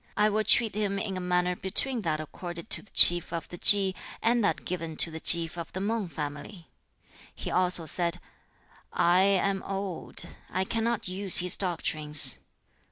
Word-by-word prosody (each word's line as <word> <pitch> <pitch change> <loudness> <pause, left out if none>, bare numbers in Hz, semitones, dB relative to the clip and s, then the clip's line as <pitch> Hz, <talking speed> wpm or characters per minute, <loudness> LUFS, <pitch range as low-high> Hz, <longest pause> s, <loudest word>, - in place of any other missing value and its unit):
I 210 +1 +2
will 215 +1 -2
treat 220 +1 +2
him 200 -1 -3
in 195 -1 -5
a - - -5
manner 180 0 -2
between 230 +7 +1
that 155 -5 -3
accorded 170 +4 -10
to - - -2
the 215 - -20
chief 175 -1 +6
of 170 -1 -6
the 175 - -11
Chi, 195 -2 +5 0.3
and 235 0 0
that 205 - -2
given 165 -3 -6
to 165 - -1
the 160 - -9
chief 170 +1 +4
of 165 - -9
the 185 - -6
Mang 210 0 -3
family.' 150 +4 -9 0.6
He - - -7
also 180 -2 0
said, 170 +2 -3 0.7
'I 175 +2 +2
am 195 0 0
old; 195 -2 -5 0.3
I 185 +2 -3
cannot 225 +1 -3
use 190 +1 +1
his 180 0 +2
doctrines.' 155 -5 +4
180 Hz, 170 wpm, -26 LUFS, 170-200 Hz, 0.7 s, chief